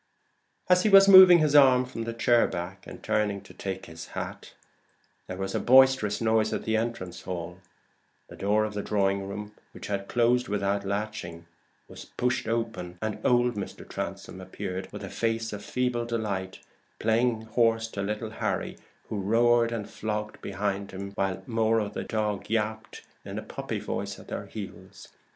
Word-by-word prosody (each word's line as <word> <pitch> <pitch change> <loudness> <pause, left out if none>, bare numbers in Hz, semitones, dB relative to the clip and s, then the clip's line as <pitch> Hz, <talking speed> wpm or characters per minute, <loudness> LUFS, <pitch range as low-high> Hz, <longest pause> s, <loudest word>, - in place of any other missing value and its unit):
As 180 0 +5
he 215 - +2
was 195 -1 +8
moving 185 -2 +10
his 155 -3 +2
arm 130 -3 +6
from 115 -3 -6
the 115 - -4
chair 120 0 +3
back, 90 +3 -6
and - - -10
turning 105 -2 0
to 95 - -15
take 95 -1 -5
his 80 -1 -10
hat, - - -6 0.7
there 90 - -6
was 95 0 -3
a - - 0
boisterous 130 -4 +5
noise 110 -1 +2
in - - -2
the 110 - 0
entrance 100 -6 -3
hall; 90 -1 -6 0.7
the - - -12
door 105 +2 +1
of 105 - -5
the 105 - -3
drawing 100 -1 0
room, 105 +1 -6 0.2
which - - -9
had 100 -1 -3
closed 120 +1 +2
without 100 0 -1
latching, 100 -5 -4 0.4
was - - -11
pushed 125 -2 -2
open, 110 -6 -3
and 110 +1 -4
old 120 -1 +3
Mr. 100 -2 -7
Transome 95 - -6
appeared 95 0 -6
with - - -8
a - - -6
face 115 -1 -1
of 105 0 -6
feeble 125 -2 -1
delight, 100 -5 -3 0.4
playing 115 0 +1
horse 115 0 +1
to 100 - -5
little 105 +2 -3
Harry, - - -3 0.3
who 105 - -3
roared 115 +3 +3
and 115 -3 -4
flogged 105 0 -4
behind 100 0 -3
him, 100 +1 -7
while 95 -1 -2
Moro 110 -2 +1 0.6
yapped 110 0 -3 0.2
in - - -7
a - - -4
puppy - - -5
voice - - -4
at - - -14
their - - -5
heels. 100 -2 -9
110 Hz, 170 wpm, -27 LUFS, 100-115 Hz, 0.7 s, moving